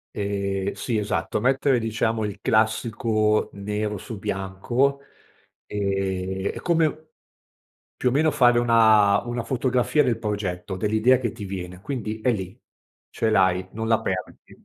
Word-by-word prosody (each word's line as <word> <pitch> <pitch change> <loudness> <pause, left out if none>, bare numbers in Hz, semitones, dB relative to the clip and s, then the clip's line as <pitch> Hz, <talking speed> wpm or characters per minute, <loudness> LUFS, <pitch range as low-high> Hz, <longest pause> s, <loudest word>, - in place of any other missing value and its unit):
Ehm, 100 -1 -2
sì 120 -3 -2
esatto, 105 0 -1
mettere 135 +2 +2
diciamo 115 0 -1
il 100 -1 -6
classico 110 0 +1
nero 105 +1 -3
su 110 +3 -7
bianco, 100 +9 -1 0.7
ehm, 95 -1 -2
è - - -5
come 165 -2 +2
u 155 +1 -8 0.9
più 125 - +1
o - - -3
meno 155 +4 +3
fare 120 -4 +4
una 110 -4 +5
una 120 0 -3
fotografia 130 +4 +1
del 115 -2 0
progetto, 100 -3 -3
dell'idea 110 +6 +3
che 120 -3 -2
ti 110 -3 -8
viene. 90 -2 -6
Quindi 110 -2 -4
è 125 - +2
lì, 95 -4 -5 0.5
ce 110 - 0
l'hai, 95 -2 +2
non 110 +1 -4
la 115 -1 +3
perdi. - - -6
110 Hz, 145 wpm, -24 LUFS, 100-120 Hz, 0.9 s, una